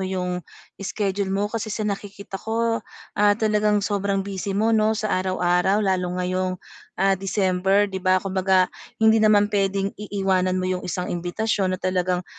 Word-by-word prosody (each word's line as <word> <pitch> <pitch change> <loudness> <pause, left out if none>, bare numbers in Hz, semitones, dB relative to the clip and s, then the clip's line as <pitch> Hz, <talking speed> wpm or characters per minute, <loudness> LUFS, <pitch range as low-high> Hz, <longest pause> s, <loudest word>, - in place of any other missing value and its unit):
yung 180 -1 -2 0.4
schedule 195 0 -2
mo 195 +2 0
kasi 220 +1 -3
sa 215 0 -3
nakikita 200 -1 -5
ko, 230 0 0 0.4
ah, 205 0 +5
talagang 210 -2 +2
sobrang 200 -1 0
busy 195 0 -4
mo 225 +2 +2
'no, 220 0 +3
sa 215 0 -2
araw-araw 185 +2 +1
lalo 185 -2 +1
ngayong, 185 0 -1 0.4
ah, 195 +1 +3
December, 195 +1 +1
'di 190 -2 -5
ba 185 0 +3
kumbaga 190 0 +2 0.3
hindi 220 0 +4
naman 210 -1 +4
puwedeng 195 -1 0
iiwanan 190 -3 0
mo 185 - -1
yung 185 0 -1
isang 180 0 -3
imbitasyon 185 +2 -1
na - - -17
talagang, 180 -1 0
195 Hz, 155 wpm, -23 LUFS, 185-210 Hz, 0.4 s, ah